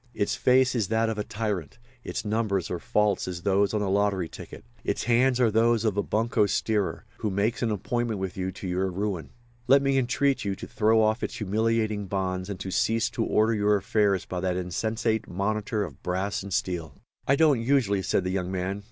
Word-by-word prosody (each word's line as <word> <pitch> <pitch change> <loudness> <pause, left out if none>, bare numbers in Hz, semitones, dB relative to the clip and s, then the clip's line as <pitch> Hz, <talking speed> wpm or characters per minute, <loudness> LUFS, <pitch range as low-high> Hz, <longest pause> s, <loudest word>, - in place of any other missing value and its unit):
Its 100 - 0
face 130 0 +3
is 115 -6 0
that 110 +1 +1
of 110 -1 -3
a - - 0
tyrant, 105 -7 -4 0.3
its - - -4
numbers 105 -4 -1
are 90 - -2
false 105 +2 +1
as 90 -1 -5
those 100 0 +2
on 105 -1 0
a - - -1
lottery 100 -3 +1
ticket; - - -11 0.2
its - - -1
hands 125 +1 +3
are 120 -3 +4
those 115 +1 +3
of 105 -3 +1
a 100 - +2
bunco 110 +1 +1
steerer, 105 -1 -1
who 110 - -1
makes 100 +4 0
an 120 - +1
appointment 110 +1 -2
with 95 -1 -4
you 95 0 -2
to 95 +1 -7
your 90 +1 0
ruin. 95 -2 -3 0.4
Let 140 +1 +6
me 135 -1 +3
entreat 135 +2 +1
you 100 -1 -1
to - - -8
throw 110 +1 +3
off 110 +2 +1
its - - -3
humiliating 110 0 0
bonds 95 0 -2
and 100 - -5
to 95 - -4
cease 115 +4 +1
to 115 - -1
order 110 +1 +2
your 105 -1 +3
affairs 100 -1 +1
by 90 - -4
that 90 0 -1
insensate 110 +5 -1
monitor 105 +3 -1
of 75 -8 -9
brass 95 +4 -2
and 100 0 -8
steel." 85 -5 -2 0.3
"I 140 - +5
don't 145 -5 +4
usually," 115 -6 +2
said 95 - 0
the 90 - -2
young 95 -1 -2
man. 95 +2 -2
105 Hz, 210 wpm, -26 LUFS, 95-115 Hz, 0.4 s, Let